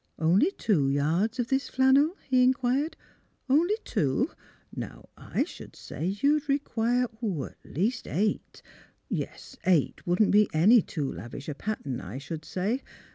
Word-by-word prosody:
" - - -46
Only 180 - +4
tivo 165 - +1
yards 165 - +1
of 240 -2 -1
this 270 0 0
flannel? 275 +6 +4
" - - -29
he 255 -1 +4
inquired. 260 +4 +2 0.2
' - - -36
' - - -41
Only 340 +9 +4
two? 135 -3 0 0.4
Now - - -7
I - - -1
should - - -11
say 160 - -5
you 285 +1 +4
would 300 -1 -2
require 250 -3 +1 0.2
at 180 -11 -3 0.2
least 225 - 0
eight. 210 +3 -2 0.5
Yes; - - -5
eight 175 -3 +2
wouldn't 180 +4 +3
be 210 0 +5
any 210 +9 +6
too 150 -6 -3
lavish 120 +10 -8
a 150 - -2
pattern, 145 - -4
I 95 +6 -7
should 155 +3 -6
say. 210 +8 -1
215 Hz, 165 wpm, -28 LUFS, 155-260 Hz, 0.5 s, any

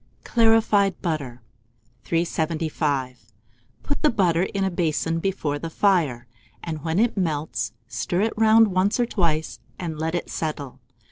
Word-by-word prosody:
CLARIFIED 220 -4 +3
BUTTER. 140 -9 -3 0.6
375. 155 -6 -1 0.6
Put 285 - -3
the 305 - +4
butter 180 - +2
in 195 +1 -1
a 190 - 0
basin 165 -1 0
before 165 -6 -2
the 165 - -5
fire, 165 -10 +1 0.4
and 155 -3 -5
when 160 +1 -1
it 235 +3 +2
melts, 155 - -2 0.2
stir 175 +8 -2
it 220 +1 +1
round 220 0 +5
once 190 +4 +1
or 240 - +3
twice, 165 -8 -1 0.2
and 160 -4 -5
let 160 +2 -1
it 175 - -2
settle. 145 -4 -4
165 Hz, 140 wpm, -24 LUFS, 155-195 Hz, 0.6 s, round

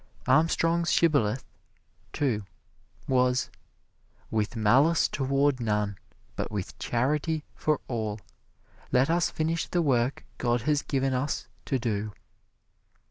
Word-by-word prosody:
Armstrong's 165 +1 +3
shibboleth, 135 -8 +2 0.7
too, 120 -8 0 0.6
was, 125 -1 +2 0.8
"With 110 +1 -1
malice 135 +10 +4
toward 135 0 +1
none, 105 -3 0 0.4
but - - -3
with 100 -3 -5
charity 150 +6 0
for 155 -2 0
all, 110 -3 -3 0.7
let 130 +5 +3
us 170 0 +2
finish 160 +1 -1
the 175 -1 +1
work 130 -2 +1
God 120 -1 +1
has 145 +1 +2
given 135 -1 0
us 130 +3 -1 0.2
to 135 - 0
do." 110 -3 -2
130 Hz, 110 wpm, -28 LUFS, 115-150 Hz, 0.8 s, malice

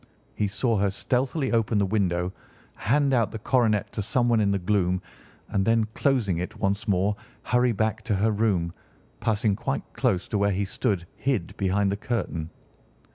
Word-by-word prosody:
He 105 - 0
saw 115 +3 0
her 100 0 +2
stealthily 130 +7 -1
open 115 -2 +2
the 100 - +3
window, 90 -3 0 0.4
hand 140 +5 +2
out 115 -5 +3
the 110 - -6
coronet 110 -2 +1
to - - -3
someone 120 +2 +2
in 105 -2 +2
the 100 - +2
gloom, 95 -1 +1 0.5
and 100 -2 +1
then 115 +1 +3
closing 115 -11 +1
it 90 - -5
once 100 +1 -1
more 100 +1 +2 0.3
hurry 125 0 +2
back 110 0 0
to 110 - +1
her 110 +3 +2
room, 100 -6 +1 0.5
passing 110 -2 +1
quite - - -2
close 90 -1 0
to 105 - 0
where 100 0 +2
he 100 +2 0
stood 95 -2 -1
hid 125 -11 -1
behind 100 +1 +1
the 100 - -1
curtain. 95 -9 -3
105 Hz, 175 wpm, -26 LUFS, 95-115 Hz, 0.5 s, the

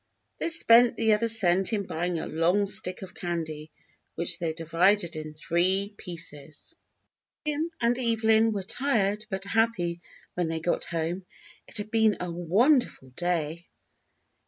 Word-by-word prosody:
They - - 0
spent 245 -7 +5
the 220 -1 +3
other 220 +2 +1
cent 195 -2 +2
in 205 -2 -1
buying 175 +1 -2
a - - -3
long 175 +6 +1
stick 185 -1 -3
of 185 - -9
candy, 160 -3 -4 0.5
which 170 - 0
they 165 -2 -1
divided 165 +3 +2
in 155 -1 -7
three 185 +6 0
pieces. 155 - -5 0.7
Jim 300 +2 -1
and 240 +1 +1
Evelyn 225 -2 +3
were 200 -3 -3
tired 215 -3 0
but 190 -2 -3
happy 200 -5 0 0.3
when 175 -2 -1
they 160 0 -2
got 170 +2 -1
home. 170 +2 -3 0.4
It - - -2
had 210 +1 -2
been 220 -2 +3
a 180 -1 -4
wonderful 190 - +2
day. 170 +1 -2
185 Hz, 145 wpm, -27 LUFS, 170-220 Hz, 0.7 s, spent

